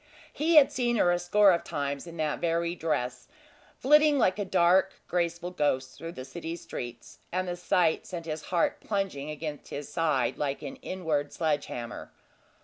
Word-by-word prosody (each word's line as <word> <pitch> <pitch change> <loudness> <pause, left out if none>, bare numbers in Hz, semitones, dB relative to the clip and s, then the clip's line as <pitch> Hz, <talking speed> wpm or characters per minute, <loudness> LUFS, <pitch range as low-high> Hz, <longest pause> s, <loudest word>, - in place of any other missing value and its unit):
He 325 +3 +1
had 290 -2 +8
seen 240 -4 0
her 180 -5 +4
a 175 - +1
score 195 +3 +5
of 170 - +1
times 140 +2 -3
in 170 0 -9
that 155 -1 -1
very 170 0 0
dress, 135 -7 -2 0.5
flitting 300 +2 +5
like 210 -5 +2
a 205 - -1
dark, 185 +1 +4
graceful 175 0 -1
ghost 135 -6 0
through 165 +3 -7
the 130 - -7
city 165 +4 -6
streets, 120 -7 -8
and 185 +1 -1
the 175 - -2
sight 175 -2 +1
sent 170 -3 -6
his 155 -1 -5
heart 175 -2 +1
plunging 195 -9 -2
against 150 -1 -6
his 145 0 -6
side 135 -7 0
like 145 0 -2
an 140 - -6
inward 160 -6 -2
sledge 155 -3 0
hammer. 120 0 -7
170 Hz, 175 wpm, -28 LUFS, 145-185 Hz, 0.5 s, had